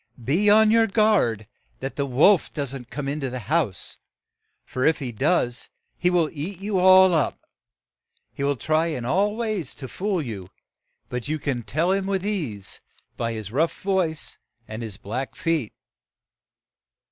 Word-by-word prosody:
Be 170 - +2
on 215 +1 +6
your 225 0 +5
guard 200 - +2 0.3
that 135 +1 -5
the 140 -1 -1
wolf 155 +9 +4
don't 135 -4 -5
come 145 -1 -4
in 145 +2 -2
the 130 -3 -3
house; 125 - -1 0.7
for 130 - -3
if 160 - +4
he 130 -4 -4
does, 125 0 0 0.3
he 180 - +1
will 175 -3 +3
eat 165 +6 -5
you 200 -1 -1
all 185 0 +7
up. 155 -4 +1 0.9
He 140 - -4
will 140 0 +2
try 155 +5 +1
in 130 -8 -3
all 200 - +1
ways 215 - -3
to 135 - -7
fool 195 +5 -2
you, 105 - -5 0.6
but 125 0 -4
you 155 +1 -1
can 140 -4 -2
tell 155 - 0
him 195 0 0
with 195 -1 -1
ease 145 - -3 0.3
by 115 -1 -2
his 110 -3 -6
rough 155 +7 0
voice 185 -5 -1 0.3
and 110 +2 -6
his 110 -4 -6
black 125 +8 -5
feet." 165 -9 -1
155 Hz, 160 wpm, -24 LUFS, 125-190 Hz, 0.9 s, all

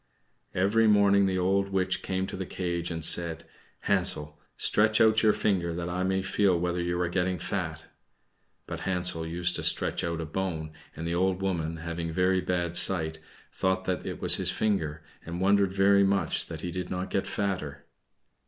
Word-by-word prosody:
Every 105 +4 +3
morning 100 -1 +4
the 95 -1 -1
old 100 +2 +1
witch 95 0 -1
came 95 0 -2
to - - -7
the 95 -1 -5
cage 85 -2 -3
and 80 -2 -3
said, 85 -1 +4 0.4
"Hansel, 75 0 0 0.2
stretch 110 +1 +3
out 110 0 +4
your 110 - +5
finger 90 -6 -1
that 85 0 -4
I 90 +1 -3
may 95 0 0
feel 95 -2 +1
whether 90 0 -1
you 85 0 -2
are 90 - 0
getting 90 +1 -1
fat." 80 -3 -4 0.8
But - - -6
Hansel 90 -3 0
used 90 +1 +1
to - - -5
stretch - - +1
out 85 -1 -2
a 80 - -3
bone, 80 -2 -4 0.2
and 80 - -6
the 85 - -2
old 95 +1 0
woman, 85 -4 -2
having 85 0 -5
very 95 +2 +1
bad 85 -2 -2
sight, 80 -4 +3 0.3
thought 95 0 -1
that 90 -1 -2
it - - -6
was - - +4
his - - 0
finger, 80 -8 -1 0.2
and 85 +1 -6
wondered 100 0 +3
very 100 +1 +4
much 95 -4 0
that - - -7
he 90 - -4
did 90 +1 -5
not 90 0 -4
get 95 - -1
fatter. 95 -9 -3
90 Hz, 185 wpm, -27 LUFS, 85-95 Hz, 0.8 s, your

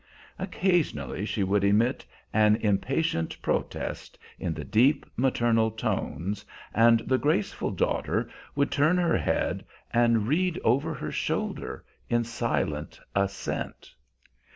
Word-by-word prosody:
Occasionally 180 - 0
she 105 - 0
would 100 +1 +2
emit 105 +5 +3 0.3
an 105 0 +5
impatient 110 - 0
protest - - -3 0.2
in - - -2
the - - -5
deep, 130 +7 +3
maternal 120 -3 +2
tones, 100 -1 -3 0.3
and 115 +1 +5
the 130 +2 +1
graceful 145 -8 0
daughter - - 0 0.3
would 140 0 +1
turn 155 +5 +3
her 175 -1 +3
head - - 0 0.3
and 115 -2 +3
read 175 +5 +1
over 140 +8 +2
her 75 - -5
shoulder - - -3 0.2
in 120 0 +2
silent 115 -10 -2
assent. 100 0 -3
115 Hz, 115 wpm, -27 LUFS, 105-145 Hz, 0.3 s, an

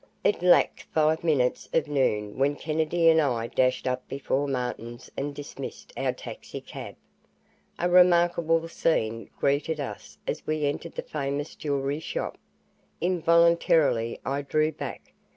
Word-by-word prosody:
It 205 - +2
lacked 180 0 +4
five 155 +1 +3
minutes 140 -7 +1
of 160 - +2
noon 110 -7 0
when 140 +2 +2
Kennedy 160 +2 0
and 160 0 +6
I 120 -6 0
dashed 130 +1 +1
up 130 0 -2
before 140 +1 -1
Martin's 125 -3 -4
and 145 +1 -3
dismissed 145 - -8
our - - 0
taxi - - -8
cab. - - -9 0.8
A 175 - +1
remarkable 175 -2 +4
scene 115 -9 0
greeted 150 +3 0
us 140 - -7
as - - -4
we 155 -1 0
entered 145 +3 -3
the - - -3
famous 145 0 -3
jewelry 140 0 -2
shop. 160 - -4 0.6
Involuntarily 170 -8 +3
I 140 +2 -1
drew 155 +2 +1
back. 150 - -8
145 Hz, 135 wpm, -27 LUFS, 135-165 Hz, 0.8 s, and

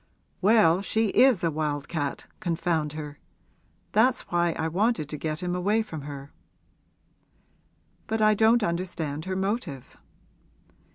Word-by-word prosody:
'Well, 195 -4 +5
she 220 +1 0
is 250 -4 +4
a 165 - +2
wild 150 -2 -2
cat 145 -4 -3
confound 165 -3 -1
her! 150 -2 -7 0.7
That's 245 +4 +3
why 175 -1 +2
I 160 - -2
wanted 190 - 0
to 150 - -4
get 155 +3 -3
him 180 0 -1
away 205 +5 +1
from 160 -8 -7
her.' 140 0 -9 1.7
'But 220 0 -1
I 215 0 +5
don't 225 +2 +4
understand 170 -4 -3
her 185 0 -3
motive.' 190 - -3
175 Hz, 130 wpm, -26 LUFS, 155-215 Hz, 1.7 s, Well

